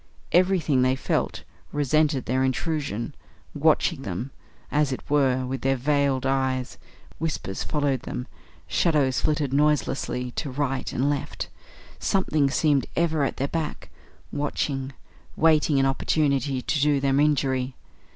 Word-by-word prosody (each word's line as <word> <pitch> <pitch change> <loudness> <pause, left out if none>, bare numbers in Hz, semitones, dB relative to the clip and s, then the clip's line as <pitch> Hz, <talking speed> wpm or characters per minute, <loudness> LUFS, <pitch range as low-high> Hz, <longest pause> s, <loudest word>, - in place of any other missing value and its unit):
Everything, 175 -7 +3
they 130 +1 +3
felt, 135 - -1 0.3
resented 145 -1 +1
their 130 +2 +1
intrusion, 135 - -2 0.4
watching 155 0 +2
them, 105 +5 -4 0.4
as 150 -2 +2
it 130 - -5
were, 130 -3 +3
with 130 +1 -4
veiled 135 0 +1
eyes; 130 -1 -1 0.4
whispers 155 -11 -3
followed 145 -3 0
them; 125 -1 -5 0.4
shadows 145 -6 +2
flitted 150 -3 0
noiselessly 135 -3 +1
to 145 - -4
right 135 -1 -2
and 130 +3 0
left; 145 0 -2 0.5
something 155 - +1
seemed 145 -1 +2
ever 160 -3 +1
at 135 - -1
their 135 - 0
back, 160 -2 -4 0.4
watching, 140 -2 -2 0.4
waiting 155 -3 +4
an 135 - +3
opportunity 135 -1 +1
to 150 - 0
do 145 -1 +3
them 135 0 +2
injury. 135 -3 +1
140 Hz, 125 wpm, -25 LUFS, 130-150 Hz, 0.5 s, waiting